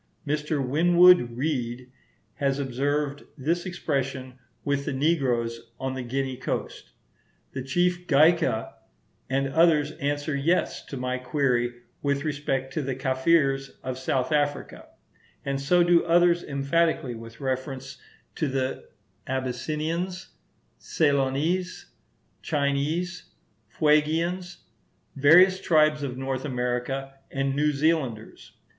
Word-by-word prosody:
Mr. 150 -2 -1
Winwood 170 -4 +5
Reade 125 -3 -3 0.5
has 140 -2 0
observed 140 +2 -1
this 170 +6 -1
expression 135 -6 -3 0.3
with 140 -1 0
the 145 - -2
negroes 120 -6 0
on 130 0 -3
the 130 - -4
Guinea 130 +1 -3
coast. - - -5 0.6
The 130 - -5
chief 175 +6 0
Gaika 150 -6 +3 0.6
and 135 +1 0
others 155 0 +3
answer 145 +1 -1
yes 160 +6 0
to 140 - -6
my 125 0 -2
query 125 -2 0 0.2
with 140 -1 0
respect 140 -3 -2
to 155 - -1
the 135 -2 -3
Kafirs 135 +1 +1
of 130 0 -4
South 130 0 -1
Africa; 145 -1 -1 0.6
and 140 0 -2
so 175 +6 +4
do 175 0 +4
others 175 0 +4
emphatically 140 -1 0
with 115 0 -11
reference 130 -1 -4 0.3
to 155 - -1
the 130 -1 -3 0.4
Abyssinians, 155 +8 -3 0.5
Ceylonese, 150 +5 0 0.5
Chinese, 150 +4 -1 0.4
Fuegians, 160 +7 +1 0.5
various 180 +7 +6
tribes 155 -3 +3
of 130 -3 -4
North 135 0 -3
America, 130 +1 -2 0.2
and 135 0 -1
New 150 +1 +2
Zealanders. 140 -7 -2
140 Hz, 110 wpm, -26 LUFS, 130-155 Hz, 0.6 s, various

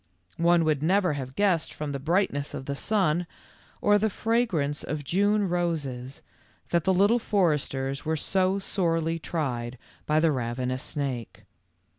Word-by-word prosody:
One 170 0 +4
would 150 -3 +1
never 180 +1 +2
have 130 -2 -6
guessed 190 -6 +2
from 150 -1 -5
the 140 - -3
brightness 155 -2 0
of 135 - -6
the 140 - -2
sun, 175 0 +1 0.5
or 205 0 +4
the 220 +1 +2
fragrance 195 -11 0
of 150 -1 -4
June 200 +7 +2
roses, 145 -8 -2 0.5
that 170 -2 +2
the 190 - +4
Little 205 +6 +4
Foresters 150 - 0
were 160 0 -1
so 190 +4 +1
sorely 165 -4 0
tried 130 -7 -3 0.3
by 155 0 +3
the 160 0 +3
ravenous 125 0 -2
snake. 135 -5 -4
160 Hz, 145 wpm, -27 LUFS, 140-190 Hz, 0.5 s, One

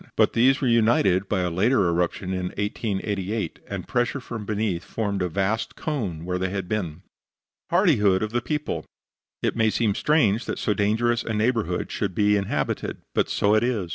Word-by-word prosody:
But - - +4
these 130 +4 +4
were 135 - +1
united 110 -5 +3
by 100 -3 +1
a 90 -1 -1
later 100 +4 +3
eruption 90 +2 -1
in 90 -1 -2
1888, 105 -2 -2
and - - -5
pressure 120 +3 0
from 115 -5 -7
beneath 105 -5 -1
formed 100 -3 -2
a 90 - 0
vast 100 +6 -1
cone 100 - -3
where 90 0 -2
they 95 0 -1
had 95 -1 -4
been. 90 -5 -3 0.7
HARDIHOOD 115 - +3
OF 110 - -3
THE 120 +1 0
PEOPLE 150 +3 -3 0.6
It - - +1
may 110 -1 +3
seem 110 -1 +1
strange 120 -5 +2
that - - -3
so 105 - 0
dangerous 115 +4 +1
a 110 - -3
neighborhood 105 -5 0
should 95 -4 -2
be 105 0 +3
inhabited. 100 -1 -2 0.2
But - - +1
so 100 +1 +2
it 110 +1 +4
is. 110 -8 -1
105 Hz, 180 wpm, -24 LUFS, 95-115 Hz, 0.7 s, But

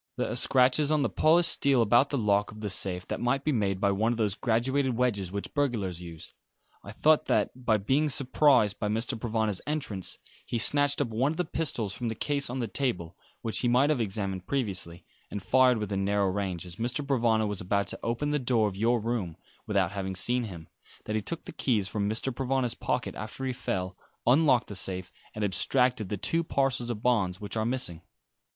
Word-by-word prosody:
There - - -1
are - - -3
scratches 130 +4 +3
on 150 -2 +2
the - - -1
polished 165 +2 +4
steel 140 -2 +2
about 120 +6 +4
the 140 - -1
lock 105 -3 +1
of 105 0 -11
the 105 -2 -2
safe 90 -1 -1
that - - -3
might 135 +3 0
be 155 - +1
made 100 -7 0
by 100 0 +2
one 110 +4 +1
of 120 - -2
those 105 -4 0
graduated 125 +3 0
wedges 100 -8 0
which 100 +1 -5
burglars 110 - -1
use. 85 -2 -10 0.5
I 100 - -9
thought 155 +8 +3
that, - - +2 0.3
being 145 +6 +2
surprised 135 -5 +3
by 105 - -1
Mr. 115 +4 -1
Provana's 110 -3 -1
entrance, 135 -11 -3 0.3
he 120 - -3
snatched 145 +5 +2
up 135 - -1
one 125 +6 +1
of 160 - -6
the 180 - 0
pistols 130 -11 -2
from 120 - -3
the 110 - -4
case 140 +1 -1
on 125 - -4
the 120 -3 -2
table 95 -8 -2 0.3
which 115 -2 0
he 125 - +1
might 130 +5 +4
have 140 -6 +1
examined 95 -3 -3
previously 95 -10 -2 0.2
and 100 - -6
fired 130 +1 +4
within 100 -2 -2
narrow 100 0 +1
range, 95 -3 -3
as 90 -1 -8
Mr. 125 +5 -2
Provana 115 -5 +2
was 105 -2 -3
about 100 +2 0
to - - -5
open 120 +6 -1
the 150 - +1
door 120 -4 +2
of 100 - -5
your 115 +4 +2
room, 110 -7 -3 0.3
without 95 -4 +1
having 95 -1 -4
seen 120 +6 +1
him; 85 -6 -9 0.4
that 110 - -3
he 110 - 0
took 165 +10 -4
the - - -7
keys 110 -7 0
from 105 0 -1
Mr. 115 +4 -1
Provana's 130 -1 -1
pocket - - -2
after 110 +5 -6
he 130 - -1
fell, 95 -5 -3 0.3
unlocked 130 -1 +4
the - - -8
safe, 95 -1 -1 0.2
and 110 - -3
abstracted 125 +2 +2
the 105 - -2
two 165 - +1
parcels 135 -5 0
of 115 -2 -4
bonds 100 -7 +1
which 105 0 -5
are 110 -1 0
missing. 115 -10 -1
115 Hz, 210 wpm, -28 LUFS, 100-130 Hz, 0.5 s, polished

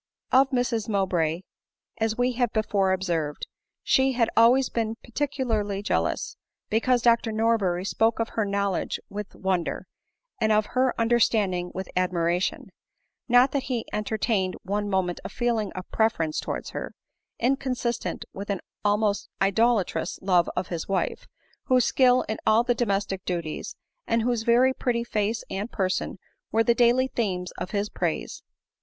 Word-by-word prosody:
Of 265 +1 +5
Mrs 240 -4 -1
Mowbray, 180 -5 0 0.6
as 220 0 0
we 245 +1 +2
have 245 -2 0
before 200 -3 +1
observed, 170 -6 -1 0.4
she 265 0 +3
had 235 -2 +1
always 245 +3 +5
been 225 -1 -2
peculiarly 230 -7 -2
jealous, - - -1 0.3
because 240 +2 +2
Dr 235 -1 +3
Norbeny 215 -5 +1
spoke 225 +3 +1
of 230 - 0
her 220 - -1
knowledge 200 -2 -1
with 205 0 -7
wonder, 185 -3 -1 0.5
and 220 - +2
of 215 0 +3
her 255 0 +2
under 235 +1 +3
standing 185 -6 +1
with 190 0 -4
admiration 180 -1 0
j - - -16 0.6
not 245 +2 +6
that 275 -2 -1
he 240 -3 -1
entertained 210 -2 0
one 205 +2 -2
moment 185 -2 0
a - - -5
feeling 235 -4 -1
of 185 0 -7
preference 165 -9 +1
towards - - -4
her, - - -6 0.4
inconsistent 250 -2 -1
with 200 +2 -7
an 200 -2 -1 0.2
almost 205 0 +1
idolatrous 210 +1 +1
love 180 -3 +3
of - - -2
his 170 -2 -4
wife, 195 -1 -2 0.4
whose 255 -2 +3
skill 255 -1 +4
in 220 - -4
mil 220 +2 +4
the 245 0 +2
domestic 200 -5 -1
duties, 170 -4 -4 0.3
and 230 0 +1
whose 240 -1 0
very 240 +3 +4
pretty 235 -2 -1
face 220 -1 -1
and 205 +4 -3
person, 190 0 -1 0.3
were 225 +1 +3
the 235 - +4
daily 245 +2 +4
themes 185 -8 -2
of - - -4
his 205 0 -1
praise. - - -3
220 Hz, 150 wpm, -26 LUFS, 190-240 Hz, 0.6 s, not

